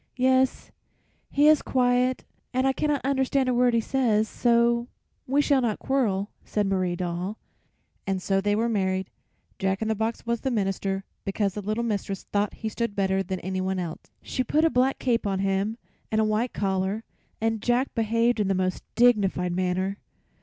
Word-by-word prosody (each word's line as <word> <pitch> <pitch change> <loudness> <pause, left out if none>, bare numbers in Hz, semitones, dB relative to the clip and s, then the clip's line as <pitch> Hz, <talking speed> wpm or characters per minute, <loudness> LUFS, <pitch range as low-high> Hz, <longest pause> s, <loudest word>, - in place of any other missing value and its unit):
"Yes, 260 0 +2 0.6
he 290 +1 +3
is 305 -1 +6
quiet 250 0 +1 0.3
and 260 +1 +2
I 270 - +3
cannot 295 0 0
understand 270 -1 +1
a 255 - +2
word 245 -1 +3
he - - +4
says, 225 -3 +1
so 235 +1 +2 0.4
we 280 +3 +3
shall 280 -3 +3
not 225 -4 0
quarrel," 210 -7 0
said 210 -1 -1
Marie 185 -2 0
Doll. 180 +3 -3 0.7
And 195 -1 0
so 195 +1 0
they 205 +1 +1
were 225 +2 +1
married. 190 -4 -1 0.5
Jack 190 0 0
in 220 - -2
the - - +3
box 220 +2 -3
was 235 -1 -1
the 265 - -1
minister, 195 -3 -1 0.2
because 195 0 -1
the 210 - -4
little 215 +4 -2
mistress 200 -4 -2
thought 205 0 -1
he 220 - -5
stood 230 -1 -3
better 190 -1 +1
than 190 0 -3
anyone 190 +1 -2
else. 170 -3 -5
She 255 - -2
put 310 +5 +2
a 325 - +3
black 255 +2 +2
cape 235 -4 0
on 195 -1 0
him 195 +3 0 0.3
and 215 - +2
a - - +4
white 215 +3 0
collar, 195 +2 -1 0.4
and 225 -1 0
Jack 245 +3 +1
behaved 230 +1 +1
in 205 - +1
the 195 - +1
most 185 0 -1
dignified 205 -7 +3
manner. 185 +2 -1
215 Hz, 180 wpm, -26 LUFS, 195-245 Hz, 0.7 s, is